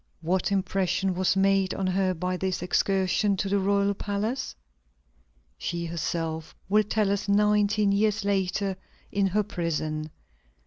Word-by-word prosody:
What 180 +4 0
impression 190 -1 0
was 185 +1 +1
made 195 -1 +2
on 195 - -2
her 185 0 +1
by 180 +2 -2
this 185 0 -2
excursion 195 +2 +1
to 200 - -1
the 200 +1 +1
royal 200 +1 +2
palace? 205 +6 -3 1.0
She 170 - -3
herself 165 -1 -3
will 210 +3 +4
tell 210 -1 +1
us 200 0 -2
nineteen 210 0 +3
years 210 +1 +1
later, 195 -1 0 0.3
in 200 -1 +2
her 210 +3 +1
prison. 155 -4 -3
195 Hz, 135 wpm, -27 LUFS, 180-200 Hz, 1.0 s, will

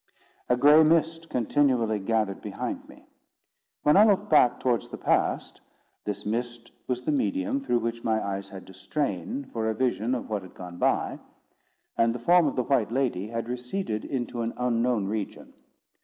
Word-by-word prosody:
A 125 - +3
gray 145 +4 +7
mist 165 +1 +2
continually 120 -3 +1
gathered 105 -1 -1
behind - - -5
me. - - -16 0.8
When 150 - +5
I 200 - +8
looked 205 -6 +2
back 125 -5 +5
towards 120 -4 0
the - - -7
past, - - 0 0.4
this 105 -1 -4
mist 120 +2 -4 0.2
was 125 -1 -2
the - - 0
medium 280 0 0
through 120 - +1
which 115 0 -3
my 110 -1 +1
eyes 100 -1 -4
had 95 -2 -10
to 95 - -13
strain 150 - -3
for 110 -1 -1
a 110 - -1
vision 125 0 0
of 125 - -5
what 105 -2 -2
had 95 - -14
gone 90 -1 -9
by; - - +1 0.8
and 115 0 +3
the - - -2
form 170 +6 +4
of 140 - -2
the 125 - +1
white 120 -5 +1
lady 120 -7 -1
had 115 +1 -4
receded 125 - -3
into 120 -3 -3
an 115 0 -3
unknown 120 -3 +1
region. 105 0 -5
120 Hz, 175 wpm, -27 LUFS, 110-145 Hz, 0.8 s, I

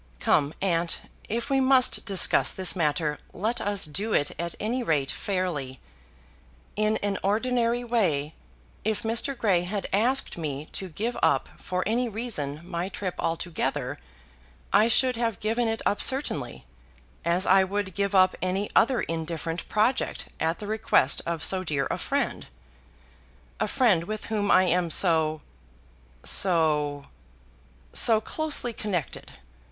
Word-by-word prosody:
Come, 145 +2 +2
aunt, 170 -3 +1 0.3
if 235 +4 -2
we 270 - +3
must 260 -2 +4
discuss 195 -3 +4
this 190 0 0
matter 150 -2 0
let 225 +6 -2
us 205 -1 +2
do 200 +9 -2
it 145 - +2
at 170 0 -3
any 240 +4 -1
rate 145 - 0
fairly. 155 -10 -3 1.0
In 215 +1 +1
an 200 -2 -1
ordinary 235 +3 0
way, 170 -11 0 0.5
if 220 0 -1
Mr. 230 +4 +1
Grey 195 -7 +2
had 195 +3 -4
asked 240 0 +1
me 150 -1 -4
to 190 - -4
give 220 +9 -3
up - - +2
for 185 0 -2
any 235 +3 0
reason 195 - -3
my 175 +1 -4
trip 190 -1 -4
altogether, 165 0 -2 0.7
I 215 - +5
should 250 +1 +3
have 230 -3 -1
given 225 +2 0
it 225 0 -2
up 205 - +1
certainly, 270 +2 0 0.6
as 175 +3 +1
I 190 +1 +5
would 195 0 -3
give 200 +1 -1
up 185 0 +5
any 190 +3 -1
other 240 +1 +4
indifferent 165 0 -4
project 220 +5 0
at 160 +1 0
the 210 - -7
request 215 -10 +2
of 170 -2 -2
so 190 -1 +2
dear 145 -5 -1
a - - -2
friend, - - -2 1.1
a - - 0
friend 215 -11 +2
with 215 +3 -5
whom 205 -1 0
I 185 - +6
am 180 -1 +1
so 160 -3 +3 0.8
so 150 -5 +1 0.9
so 225 -2 +4
closely 285 0 -3
connected. 195 -9 -4
195 Hz, 140 wpm, -26 LUFS, 165-225 Hz, 1.1 s, I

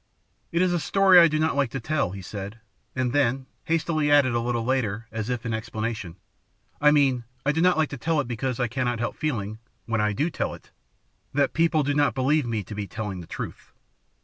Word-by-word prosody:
"It 170 +2 +2
is 180 -1 +2
a 175 - +1
story 190 +1 +6
I 170 - +8
do 155 -1 0
not 155 -1 +1
like 140 -3 +1
to 135 - -4
tell," 140 - 0
he 95 +1 -8
said, 100 +3 -7 0.4
and 130 -1 0
then 135 -4 +3
added 135 -1 -12 0.2
hastily 160 -2 +1
a 145 0 +7
little 120 -2 -1
later, 115 -4 -1
as 110 0 -4
if 125 -1 -3
in 115 - -2
explanation, 110 -5 -4 0.7
"I 150 - +7
mean 135 -5 +3 0.2
I 145 - +4
do 160 +2 0
not 180 -1 +4
like 155 -1 +2
to 140 - -6
tell 160 +3 +1
it 145 - -1
because 125 +1 -3
I 125 - +1
cannot 120 0 -1
help 120 +1 -3
feeling, 110 -8 -3 0.3
when 115 -1 0
I 105 0 +1
do 150 - 0
tell - - -2
it, - - -18 0.6
that 140 -1 +2
people 165 -2 +2
do 145 +1 0
not 145 0 +2
believe 135 +1 +2
me 110 -3 -2
to 105 - -9
be 105 -1 -4
telling 100 -1 -5
the 85 - -12
truth. - - -7
130 Hz, 225 wpm, -25 LUFS, 115-150 Hz, 0.7 s, I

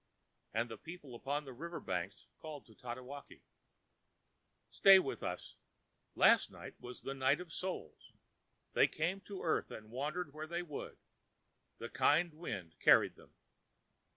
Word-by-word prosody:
And 115 +2 0
the 115 -2 -8
people 160 -5 -9
upon 145 +5 -2
the 135 - -8
river 170 +7 -5
banks 95 +1 -3
called 155 -3 -8
to 110 - -17
Tatewaki: 125 +5 -8 1.3
ãStay 195 -1 +9
with 140 - -3
us. - - -5 0.6
Last - - +6
night - - -9
was 125 0 -8
the 135 - -3
Night 135 +2 +3
of 175 -3 -8
Souls. 180 - -5 0.6
They - - +6
came 175 +5 -1
to 200 -1 -7
earth 160 - +1
and 110 0 -9
wandered 145 +5 -2
where 155 +1 -6
they 170 +2 -2
would, 150 -5 -6 0.8
the - - -5
kind 170 -1 +3
wind 95 - -6
carried - - +6
them. - - -19
145 Hz, 145 wpm, -36 LUFS, 120-170 Hz, 1.3 s, ãStay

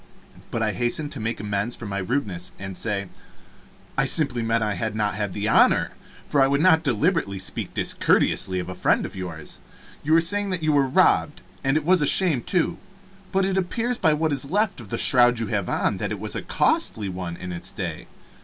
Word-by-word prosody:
But 115 - -2
I 110 - +1
hastened 120 - -1
to 140 - -7
make 115 +1 -3
amends 105 +3 -2
for 120 - -9
my 100 -1 -3
rudeness, 95 -5 -3
and 95 -1 -7
say, 100 0 -2 0.9
"I 135 - +2
simply 135 -3 +2
meant 115 0 0
I 105 -1 -1
had 110 +3 -3
not 105 -2 0
had 105 -1 -3
the 105 0 -2
honor 115 - +4 0.3
for 145 - +1
I 135 - +5
would 140 +1 +1
not 160 -1 +5
deliberately 135 - 0
speak 95 - -3
discourteously 95 -1 +2
of 90 - -4
a - - -5
friend - - +1
of - - -8
yours. 85 -5 -6 0.4
You 155 - 0
were 165 - +6
saying 205 +4 0
that 180 -3 -3
you 155 - +2
were 140 -2 +3
robbed 130 - +2 0.2
and 135 +2 +2
it 155 - -2
was 180 0 +4
a 145 - +2
shame, 165 -9 +5
too 170 - -1 0.5
but 190 0 +1
it 190 0 -1
appears 230 +6 -1
by 160 -3 +3
what 155 +1 0
is 140 -1 0
left 200 - 0
of 105 - -12
the - - -2
shroud 120 -2 +5
you 115 - -1
have 100 -4 -1
on - - 0
that - - -3
it - - -4
was - - -3
a - - -3
costly 105 -3 +1
one 90 -2 -5
in 90 0 -7
its 85 - -4
day. - - -6
120 Hz, 220 wpm, -23 LUFS, 100-160 Hz, 0.9 s, were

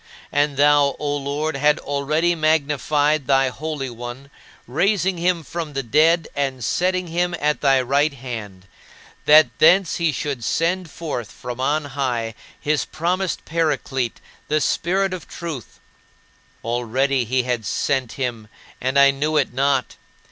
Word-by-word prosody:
And 145 -1 +1
thou, 145 -1 +4
O 145 -1 -2
Lord, 145 +2 -2
had 150 +2 +3
already 150 +5 0
magnified 150 -2 +1
thy 135 -1 +3
Holy 145 -1 -5
One, 120 +4 -8 0.3
raising 185 - +1
him 175 -1 +1
from 160 -2 -5
the 135 0 -2
dead 155 +6 +3
and 135 -3 -2
setting 185 +4 0
him 175 +1 -1
at 150 0 0
thy 135 -2 +4
right 140 +4 +2
hand, 110 -8 -7 0.6
that 150 -3 +7
thence 175 +3 +5
he 170 -2 +1
should 140 -4 -4
send 170 +8 0
forth 140 - -5
from 125 0 -7
on 145 +3 0
high 125 -5 -2 0.3
his 150 0 0
promised 180 +2 -2
"Paraclete, 145 -6 -1 0.3
the 155 +1 +1
Spirit 190 +5 0
of 185 - -7
Truth." 160 -8 -7 0.8
Already 125 +3 0
he 125 +2 0
had 120 -2 -2
sent 130 +3 -1
him, 120 -5 -4 0.3
and 130 +2 0
I 140 0 +7
knew 150 +3 -1
it 135 -4 +1
not. 135 0 0
145 Hz, 140 wpm, -21 LUFS, 130-160 Hz, 0.8 s, that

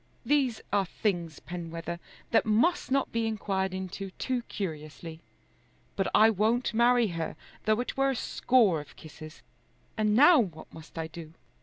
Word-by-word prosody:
These 270 -6 +1
are 200 -2 +2
things, 175 -6 -2
Penwether, 170 0 -6 0.3
that 230 - +4
must 235 +12 +2
not 275 0 +1
be 230 -1 0
inquired 195 -3 -1
into 190 +1 -5
too 255 -2 -1
curiously. 160 -3 -6 0.8
But 195 - 0
I 220 +1 +7
won't 225 +4 +1
marry 240 0 +4
her 165 -2 -4 0.3
though 215 +1 +2
it 250 - -5
were 270 0 +3
a 270 - 0
score 225 -10 +2
of 145 - -15
kisses. 155 0 -12 0.5
And 215 -1 +2
now 295 +6 +7
what 170 -9 -4
must 160 +1 -13
I 165 - -2
do?" 160 0 -10
200 Hz, 155 wpm, -29 LUFS, 165-235 Hz, 0.8 s, I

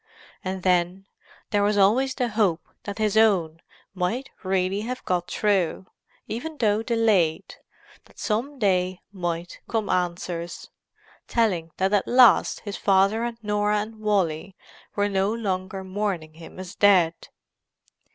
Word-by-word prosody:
And 185 -1 -4
then, 180 +1 +1 0.5
there 205 - +2
was 205 +1 +2
always 245 +7 +3
the 250 -3 0
hope 205 -6 +1 0.2
that 205 -1 -5
his 215 -1 0
own 180 -7 +3 0.3
might 200 +9 -2
really 190 +1 0
have 250 +3 -5
got 175 -1 -1
through, 190 -4 0 0.4
even 300 +8 -5
though 215 -3 +2
delayed; 220 -9 +1 0.5
that - - -23
some 245 +7 -2
day 185 -4 +1
might 175 -2 -4
come 220 -3 -1
answers, 175 -1 -3 0.6
telling 190 -9 +1
that 190 +2 +1
at 205 - +2
last 245 -3 +5
his 205 -2 -6
father 200 +3 +3
and 235 -1 -3
Norah 210 0 +1
and 220 +1 -8
Wally 190 -4 0 0.4
were 205 0 +2
no 195 0 +1
longer 190 -4 -3
mourning 190 -5 -3
him 165 +2 -13
as 185 0 -8
dead. 185 -6 +4
200 Hz, 135 wpm, -25 LUFS, 180-215 Hz, 0.6 s, last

